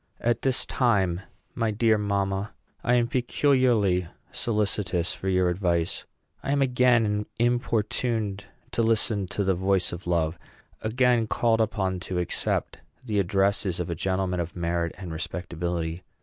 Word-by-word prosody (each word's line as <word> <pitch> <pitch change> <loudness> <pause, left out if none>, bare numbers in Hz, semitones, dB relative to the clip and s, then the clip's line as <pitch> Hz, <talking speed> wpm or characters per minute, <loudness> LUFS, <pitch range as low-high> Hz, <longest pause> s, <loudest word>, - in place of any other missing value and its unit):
At 120 0 +1
this 130 -2 +1
time, 95 -8 +1 0.3
my 115 -1 0
dear 110 +1 +3
mamma, 100 0 -1 0.3
I 125 - +3
am 120 -1 +3
peculiarly 120 - +2 0.2
solicitous 105 -5 -1
for 95 - -3
your 95 -1 +3
advice. 85 -2 0 0.4
I - - -2
am 140 - +2
again 125 -5 +3
importuned 115 -3 0 0.3
to - - 0
listen 110 -3 +1
to 100 - -2
the 95 0 +2
voice 95 0 +1
of 85 +1 -8
love; 85 -1 0 0.4
again 120 0 +2
called 115 0 +2
upon 95 -4 0
to 90 0 -4
accept 90 -1 -1 0.3
the 105 -4 0
addresses 100 -1 +1
of 90 -1 -2
a - - -1
gentleman 95 +1 -1
of 85 0 -4
merit 85 -1 -1
and 90 -3 -7
respectability. 85 0 -3
100 Hz, 140 wpm, -26 LUFS, 90-115 Hz, 0.4 s, dear